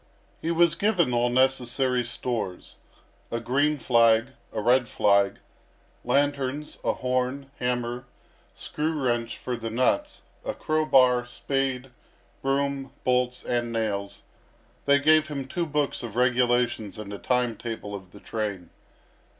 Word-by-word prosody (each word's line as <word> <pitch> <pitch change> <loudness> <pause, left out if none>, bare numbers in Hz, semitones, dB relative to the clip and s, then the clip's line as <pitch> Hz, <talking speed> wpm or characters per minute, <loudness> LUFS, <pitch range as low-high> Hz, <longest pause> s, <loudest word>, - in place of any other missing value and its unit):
He 165 - -2
was 170 0 +4
given 180 - +1
all 120 0 +2
necessary 130 0 +2
stores 115 -5 -4 0.5
a 115 - -2
green 145 +6 +1
flag, 115 -2 +4 0.2
a - - -3
red 120 +3 +3
flag, 100 -1 +3 0.7
lanterns, 140 +2 0
a - - +1
horn, 130 +2 -2
hammer, 125 0 -2 0.5
screw 155 +1 -3
wrench 120 -3 -1
for 125 - -3
the 115 -1 -5
nuts, 210 - 0 0.2
a - - -3
crow 155 0 0
bar, 125 -3 +5
spade, 135 0 -2 0.5
broom, 135 0 -1
bolts, 125 0 +1
and 120 -1 -1
nails; 100 -3 -3 0.6
they 140 0 +5
gave 155 +2 +4
him 140 -3 -4
two 170 +5 -2
books 150 -1 -1
of 115 -3 -7
regulations 120 -4 +1
and 105 -1 -7
a 100 - -6
time 125 +3 +1
table 110 -2 -6
of 95 -2 -8
the 100 - -13
train. 100 -6 -4
125 Hz, 135 wpm, -26 LUFS, 115-140 Hz, 0.7 s, bar